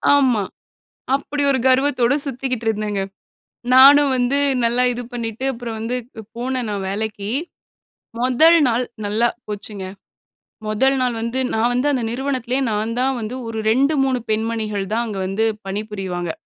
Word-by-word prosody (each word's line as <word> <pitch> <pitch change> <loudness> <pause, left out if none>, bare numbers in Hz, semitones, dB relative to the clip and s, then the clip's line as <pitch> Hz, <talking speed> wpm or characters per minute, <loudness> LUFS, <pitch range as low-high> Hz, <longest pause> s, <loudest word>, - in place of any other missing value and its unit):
ஆமா 255 -6 +3 0.7
அப்படி 290 +1 -3
ஒரு 265 - +1
கர்வத்தோடு 260 -1 +3
சுத்திக்கிட்டு 255 -3 -3
இருந்தேங்க. 210 -2 -1 0.7
நானும் 280 +2 +8
வந்து 250 +2 +1 0.3
நல்லா 240 +2 +2
இது 245 - -5
பண்ணிட்டு 230 +1 -4
அப்புறம் 235 -2 -6
வந்து 230 +3 -2 0.4
போனேன் 250 0 -2
நான் 200 -2 -3
வேலைக்கி. 205 0 -3 0.9
முதல் 285 +7 +5
நாள் 240 +1 +1 0.2
நல்லா 215 +4 +2 0.2
போச்சுங்க. 205 -1 -6 0.8
முதல் 265 +6 +2
நாள் 250 -2 0
வந்து, 235 +3 -2
நான் 225 +2 +2
வந்து 250 +4 +1
அந்த 255 -4 0
நிறுவனத்திலே 255 0 -2
நான் 215 +2 -1
தான் 265 +1 +1
வந்து 220 +2 -5
ஒரு 225 -1 -5
2 275 +6 +3
3 260 -2 +1
பெண்மணிகள் 215 -2 -1
தான் 235 +2 0
அங்க 205 -3 -4
வந்து 200 +4 0 0.2
பணிபுரிவாங்க. 195 -4 -4
235 Hz, 140 wpm, -20 LUFS, 215-260 Hz, 0.9 s, நானும்